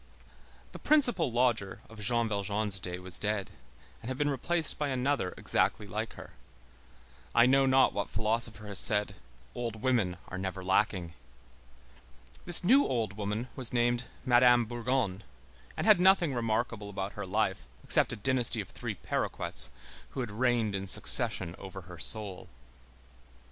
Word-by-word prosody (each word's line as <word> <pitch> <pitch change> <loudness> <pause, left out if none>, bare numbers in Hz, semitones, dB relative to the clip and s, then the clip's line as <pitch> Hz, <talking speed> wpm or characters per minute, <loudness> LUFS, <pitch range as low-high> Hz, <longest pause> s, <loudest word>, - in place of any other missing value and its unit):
The - - -10
"principal 245 - +2
lodger" 120 -5 -1
of 115 -1 -14
Jean 115 +1 0
Valjean's 100 -1 0
day 90 0 -6
was 90 -1 -2
dead 105 -2 -3 0.5
and 115 - -8
had 130 - -5
been 145 0 0
replaced 160 +4 +1
by 150 - -1
another 130 -6 -2
exactly - - -1
like - - -5
her. - - -12 1.0
I 120 0 +6
know 135 +1 +3
not 130 0 +3
what 100 - -4
philosopher 110 0 -3
has 100 -2 -1
said: 105 -2 +2 0.4
"Old 115 -3 -6
women 115 -9 0
are 90 - -7
never 95 0 -5
lacking." 95 -3 -1 1.3
This 175 +1 +10
new 260 +10 +4
old 115 -5 -2
woman 105 +4 -5
was 125 -3 +3
named 120 0 0 0.2
Madame 120 -1 +4
Bourgon, 120 -4 -3 0.6
and - - -3
had 215 -4 +5
nothing 180 -5 +3
remarkable 115 -2 -3
about 100 0 -6
her 105 -2 -7
life 100 0 -2 0.2
except - - 0
a - - -4
dynasty 125 +2 0
of - - -6
three - - -6
paroquets, - - 0 0.5
who - - -1
had 120 -4 -5
reigned 115 -1 0
in 100 0 -5
succession 85 -2 +4
over 95 0 -9
her 90 -1 -13
soul. 100 -1 -2
115 Hz, 150 wpm, -29 LUFS, 100-130 Hz, 1.3 s, This